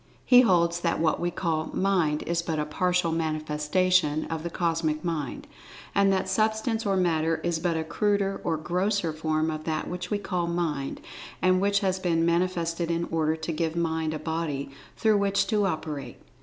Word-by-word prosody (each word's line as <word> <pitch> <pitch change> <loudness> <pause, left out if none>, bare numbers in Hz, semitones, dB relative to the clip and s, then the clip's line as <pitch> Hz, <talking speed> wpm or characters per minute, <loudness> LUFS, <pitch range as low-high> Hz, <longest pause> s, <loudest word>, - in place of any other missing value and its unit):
He 250 -1 +8
holds 175 -6 +3
that 170 -1 0
what 160 -1 +1
we 175 - 0
call 160 -2 -2
"Mind" 180 -6 +1
is 170 0 -1
but 165 -2 -3
a 150 - 0
partial 180 +2 +1
manifestation 155 +1 +1
of 160 -1 -2
the 170 - -4
Cosmic 165 -2 -1
Mind. 155 -6 -3 0.5
And 200 -1 +4
that 190 -1 0
Substance 220 +3 0
or 195 -1 +2
Matter 165 -3 +1
is 170 -2 0
but 170 -1 0
a 160 - -1
cruder 200 +3 0
or 165 -2 0
grosser 180 +2 0
form 155 0 0
of 155 0 -6
that 155 -1 -2
which 180 0 -5
we 210 - +1
call 180 -4 -2
Mind, 165 -5 -2 0.4
and 185 0 +3
which 200 +1 +2
has 190 -1 0
been 165 -3 +1
manifested 170 -1 0
in 170 0 0
order 160 -1 +1
to 160 +1 -4
give 165 0 -1
Mind 160 -2 -1
a - - -2
Body 155 -3 -3 0.3
through 215 -2 +3
which 200 0 +2
to 210 -3 +1
operate. 150 -7 -4
170 Hz, 185 wpm, -27 LUFS, 160-185 Hz, 0.5 s, He